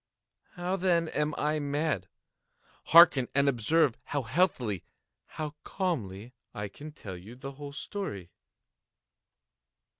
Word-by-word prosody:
How, 180 +1 -2
then, 170 -3 +2
am 150 0 -1
I 150 +1 +1
mad? 145 - -1 0.8
Hearken! 160 -7 +8
and 140 0 +4
observe 140 +1 +2
how 145 -2 -2
healthily—how 140 - -2
calmly 120 - -3 0.2
I 105 -1 -4
can 150 +9 -10
tell 100 -10 -8
you 100 +7 -11
the 135 +2 -7
whole 140 +1 -8
story. 140 - -5
145 Hz, 110 wpm, -29 LUFS, 115-165 Hz, 0.8 s, Hearken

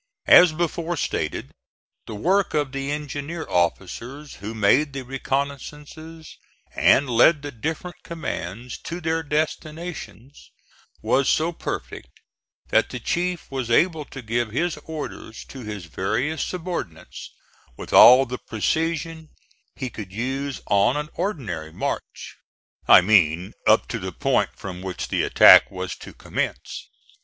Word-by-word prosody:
As 175 -2 +8
before 170 +1 -2
stated, - - -3 0.6
the 110 - -6
work 185 - +1
of 145 -3 0
the 135 0 -4
engineer 150 +2 -5
officers 115 - -2
who 110 +3 -7
made 130 +8 +3
the 135 -1 -5
reconnoissances 145 +4 -5 0.4
and 140 - +4
led 135 +5 +4
the 145 - -5
different 160 +8 -5
commands 120 - -6
to 170 +1 -6
their 165 -1 -1
destinations, 155 -2 -5 0.5
was 135 0 +2
so 160 +2 +2
perfect 170 - -6 0.6
that - - +3
the - - -6
chief 175 -2 -2
was 130 -3 -3
able 160 +5 +2
to 135 -2 -10
give 115 +1 -1
his 165 +9 -1
orders 150 -7 -7
to 135 - -11
his 105 -6 -7
various 110 - -2
subordinates 170 - -6 0.5
with - - -8
all 130 +2 +9
the 125 0 -6
precision 160 +6 -2 0.5
he 130 -3 -5
could 100 -4 -8
use 135 +5 -3
on 100 +7 +2
an 150 0 -4
ordinary 110 - -4
march. - - -5 0.5
I - - +9
mean, 90 -3 +3
up - - +4
to - - -3
the - - -5
points - - 0
from 90 -1 -8
which 95 -1 -5
the - - 0
attack - - +7
was - - -5
to - - -11
commence. - - -5
140 Hz, 135 wpm, -23 LUFS, 110-160 Hz, 0.6 s, all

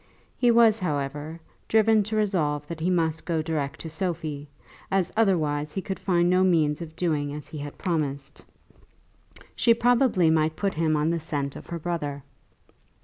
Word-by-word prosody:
He 245 - +2
was, 230 -2 +5
however, 150 -1 -3 0.3
driven 220 0 +4
to 220 +1 -3
resolve 160 -9 0
that 165 +1 -7
he 170 +3 0
must 165 -3 0
go 165 -3 -1
direct 150 -4 -3
to 165 - -6
Sophie, 155 -4 -3 0.4
as 190 -2 +1
otherwise 155 -9 +1
he 195 - -2
could 190 - -4
find 175 -2 +2
no 185 +1 +3
means 160 -4 +2
of 160 -1 -8
doing 150 -5 -1
as 150 - -8
he 155 - -7
had 145 0 -7
promised. 145 -6 -3 1.1
She 230 -2 +4
probably 235 -8 +3
might 155 0 +1
put 200 +2 -1
him 160 -1 +1
on 150 +2 +1
the 170 - -1
scent 145 -3 -3
of - - -10
her 170 - -4
brother. 150 -4 -4
165 Hz, 170 wpm, -26 LUFS, 150-185 Hz, 1.1 s, was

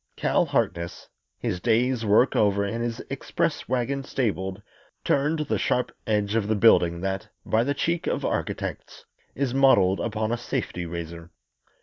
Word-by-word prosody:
Cal - - +2
Harkness, 85 0 -2 0.3
his 90 - -2
day's 120 +3 +1
work 110 +5 +4
over 100 -1 +3
and 115 +4 -2
his 120 -1 -3
express - - -2
wagon 130 +2 -1
stabled, 100 -8 -2 0.4
turned 150 +3 +1
the - - 0
sharp 125 - 0 0.2
edge 105 -1 +1
of 110 -2 +1
the 110 - +1
building 85 -5 +4
that, 95 0 -3 0.2
by 110 +1 +2
the 140 +3 -1
cheek 170 +3 -1
of - - -1
architects, - - -4 0.3
is 135 -2 -1
modelled 100 -9 +4
upon 110 0 -2
a 120 - 0
safety 120 -8 -3
razor. 85 0 -7
110 Hz, 150 wpm, -25 LUFS, 95-125 Hz, 0.4 s, work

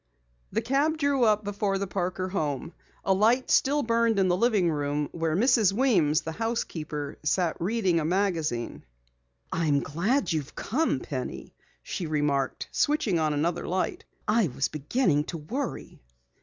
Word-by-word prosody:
The 225 +3 -1
cab 285 +6 +1
drew 280 -4 +2
up 215 -1 +3
before 200 -1 -1
the 200 - -2
Parker 185 0 -2
home. 155 -4 -2 0.3
A 195 - +4
light 230 +6 +2
still 290 +2 +3
burned 230 -1 +2
in 190 -1 +3
the 175 - +3
living 200 -4 +2
room 145 0 -1
where 165 -2 -1
Mrs. 220 -1 +4
Weems, 195 - +3
the 160 - -5
housekeeper, 160 -9 -3
sat 165 +2 +1
reading 190 -3 +1
a - - -1
magazine. 165 -8 -1 0.7
"I 165 -1 0
am 145 -1 +3
glad 190 - 0
you 160 - +1
have 145 - -10
come, 260 - 0
Penny," 125 - -6 0.3
she 175 - -4
remarked, 145 -3 0
switching 285 - +1
on 155 -1 +1
another 165 +4 -1
light. 185 +1 -1 0.2
"I 215 -2 +3
was 135 0 -1
beginning 150 - +1
to 170 - -5
worry." 245 - -5
185 Hz, 155 wpm, -27 LUFS, 155-230 Hz, 0.7 s, A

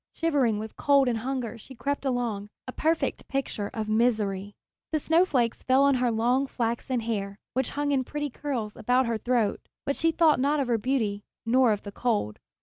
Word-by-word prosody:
Shivering 280 -10 +2
with 215 +1 -7
cold 280 -2 +4
and 235 -2 0
hunger 245 -2 -3
she 265 +4 -12
crept 280 +3 -2
along, 235 -6 -1 0.2
a - - -4
perfect 320 +5 -1
picture 265 -7 -2
of 220 -1 -4
misery! 215 -3 0 0.4
The 310 - +1
snowflakes 295 -8 +2
fell 260 +1 +4
on 280 0 +5
her 250 - +3
long 245 +4 +1
flaxen 235 0 -2
hair, 200 -3 -3 0.2
which 260 0 0
hung 290 0 +1
in 270 -2 +2
pretty 295 +1 -4
curls 240 -7 -4
about 250 +3 +2
her 230 -2 -1
throat; 235 -3 +1 0.3
but 280 - 0
she 330 0 +2
thought 320 -3 +4
not 290 +3 +2
of 265 -3 -1
her 230 -2 +2
beauty 220 -4 0 0.2
nor 245 +1 +4
of 210 - -1
the 200 - -7
cold. 205 - -1
245 Hz, 190 wpm, -27 LUFS, 220-275 Hz, 0.4 s, on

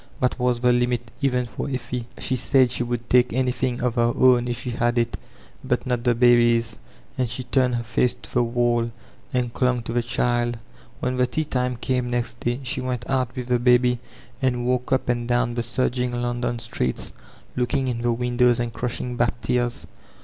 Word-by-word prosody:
That 125 +1 0
was 125 -1 +1
the 125 0 +4
limit, 120 -1 0
even 125 -2 +1
for 120 - -5
Effie. 125 -2 -4
She 130 - -1
said 130 0 +3
she 125 - -2
would 120 -1 -3
take 125 0 +4
anything 125 0 0
of 125 -2 +1
her 120 -1 +2
own 125 -1 +5
if 120 -1 -2
she 125 - -4
had 120 +1 0
it, 115 0 +1 0.5
but - - -1
not 125 -2 -1
the 120 -1 +3
baby's; 120 -2 +4 0.4
and 125 -2 +1
she 120 +3 -4
turned 125 0 +1
her 120 - -2
face 115 +2 +1
to - - -12
the 125 - +3
wall 120 0 +1 0.4
and 125 -2 -1
chiQg 125 -2 +1
to 115 - -5
the 120 - +2
child. 120 0 0 0.4
When 125 0 -1
the 125 0 +3
tea 155 +6 -2
time 125 -3 -1
came 125 0 -1
next 120 -1 -2
day 120 +3 -2
she 130 +1 -2
went 125 -2 -3
out 130 -2 0
with 125 -2 -4
the 125 -1 +3
baby 125 0 +4 0.4
and 125 -2 0
walked 125 0 0
up 130 - +1
and 120 -1 0
down 120 0 +1
the 120 - -1
surging 125 0 -1
London 120 0 -1
streets 110 - -3 0.4
looking 130 +2 0
in 120 -2 -2
the 120 0 +1
windows 120 0 +2
and 120 -1 -2
crushing 120 +1 -3
back 120 0 +1
tears. 120 -1 -1
120 Hz, 200 wpm, -23 LUFS, 120-125 Hz, 0.5 s, own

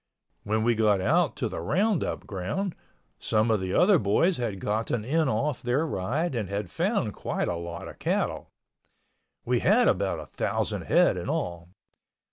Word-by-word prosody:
When 110 +1 0
we 120 +1 +3
got 105 -3 +3
out 95 - +2
to - - -2
the - - -5
roundup 185 - 0
ground, 105 - -3 0.5
some 110 +1 +1
of 110 - +2
the 95 0 -2
other 185 -1 +5
boys 150 - +2
had 110 -6 -3
gotten 110 +2 -1
in 155 +2 +1
off 130 +5 -1
their 125 +6 +1
ride 145 - -1
and 110 -6 -2
had 100 +1 -3
found 170 - 0
quite - - -2
a 90 - -1
lot 85 0 -6
of - - -11
cattle. - - -1 1.0
We 120 0 +2
had 225 - +4
about 95 -3 +1
a 75 - -7
thousand - - -2
head - - +4
in - - -4
all. 85 -1 -3
110 Hz, 170 wpm, -27 LUFS, 95-155 Hz, 1.0 s, other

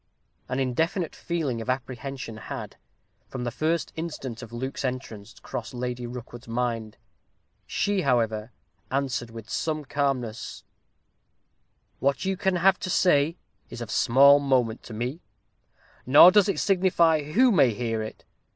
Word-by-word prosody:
An 130 +1 -1
indefinite 160 +7 -1
feeling 150 -9 -2
of 115 - -6
apprehension 130 -2 -4
had, - - -7 0.5
from 130 -2 -6
the 120 - -2
first 160 +6 -1
instant 145 -8 -5
of 115 -2 -10
Luke's 130 +4 -4
entrance 115 -5 -5
crossed 120 +1 -6
Lady 125 0 -4
Rookwood's 120 0 -9
mind. 115 -2 -2 0.7
She, 200 -2 0
however, 115 -5 0 0.4
answered, 130 -3 -1
with 115 -1 -10
some 155 -2 -2
calmness: 130 -6 -2 1.4
"What 140 +3 0
you 190 0 0
can 190 0 0
have 185 +2 +3
to 185 - -4
say 165 -3 +3 0.3
is - - -8
of 115 -2 -6
small 140 +4 +6
moment 125 -5 +1
to 115 - -9
me 125 +9 -4 0.9
nor 150 +7 +9
does 205 0 +4
it - - 0
signify 175 -5 +3
who 255 +3 +5
may 140 - +5
hear 115 0 -2
it. 110 - -8
130 Hz, 140 wpm, -26 LUFS, 120-160 Hz, 1.4 s, nor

